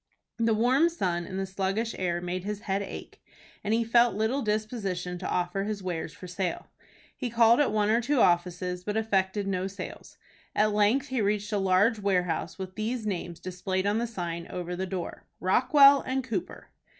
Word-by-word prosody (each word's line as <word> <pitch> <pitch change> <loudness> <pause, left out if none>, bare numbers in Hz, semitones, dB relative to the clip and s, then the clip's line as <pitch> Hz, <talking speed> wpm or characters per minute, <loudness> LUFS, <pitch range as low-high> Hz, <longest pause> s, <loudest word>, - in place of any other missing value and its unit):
The 225 -1 +3
warm 255 +9 +4
sun 175 - -2
and 190 - -5
the 195 - -1
sluggish 195 +4 -2
air 175 -2 -1
made 180 +1 -3
his 210 +1 -4
head 195 -2 -1
ache, 200 - -8 0.4
and 205 - -1
he 230 +1 +3
felt 235 0 +4
little 220 +6 0
disposition 210 -5 -2
to 185 - -4
offer 180 +2 -1
his 210 -2 -4
wares 175 -3 -3
for - - -11
sale. 180 0 -4 0.4
He 250 - -3
called 235 +1 +5
at 290 - +3
one 210 0 +2
or 230 +2 +3
two 280 +3 +1
offices, 180 -1 +1
but 210 +3 -2
effected 200 -2 0
no 190 -1 -1
sales. 195 +1 -9 0.4
At 215 0 +3
length 215 +7 +2
he 260 -3 0
reached 205 +1 0
a 205 - +2
large 195 +4 +3
warehouse 180 -3 0
with 190 -1 -6
these 220 +3 -3
names 175 -4 -4
displayed 185 +1 -3
on 205 +2 +2
the 235 - -1
sign 170 -6 -5
over 180 0 -5
the 190 +1 -3
door: 180 -2 -5
"ROCKWELL 275 +8 +6 0.2
& - - -15
COOPER." 215 -8 -5
200 Hz, 185 wpm, -28 LUFS, 180-225 Hz, 0.4 s, ROCKWELL